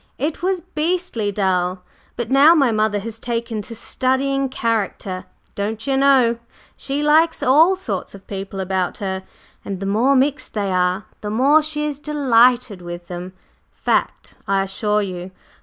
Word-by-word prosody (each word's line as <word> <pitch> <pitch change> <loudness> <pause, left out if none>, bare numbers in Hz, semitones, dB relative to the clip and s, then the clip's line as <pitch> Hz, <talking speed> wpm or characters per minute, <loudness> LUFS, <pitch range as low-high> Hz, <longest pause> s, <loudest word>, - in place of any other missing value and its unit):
It 300 +5 -3
was 370 0 0
beastly 330 - -2
dull! 185 -2 0 0.3
But 240 0 -4
now 285 +5 +7
my 275 -6 +3
mother 215 -1 +1
has 225 +1 -6
taken 230 -2 -3
to 230 +3 -9
'studying 270 +3 0
character,' 215 -6 -2 0.3
don'cher 220 +6 -2
know; 265 -4 +4 0.4
she 280 +2 -3
likes 320 +2 +3
all 315 +9 +5
sorts 205 - -4
of 195 - -14
people 195 0 -6
about 185 -1 -1
her, 190 -1 -3 0.4
and 195 -2 -5
the 195 - -4
more 230 +8 +2
mixed 275 0 0
they 200 -2 -1
are 180 +2 +1 0.2
the 210 - -4
more 270 +8 +4
she 300 -1 -1
is 290 -2 -4
delighted 250 -7 +2
with 175 0 -8
them. 180 +1 -6 0.4
Fact, - - -1
I 195 -1 +2
assure 210 +2 0
you! 180 -1 -6
230 Hz, 155 wpm, -20 LUFS, 195-275 Hz, 0.4 s, now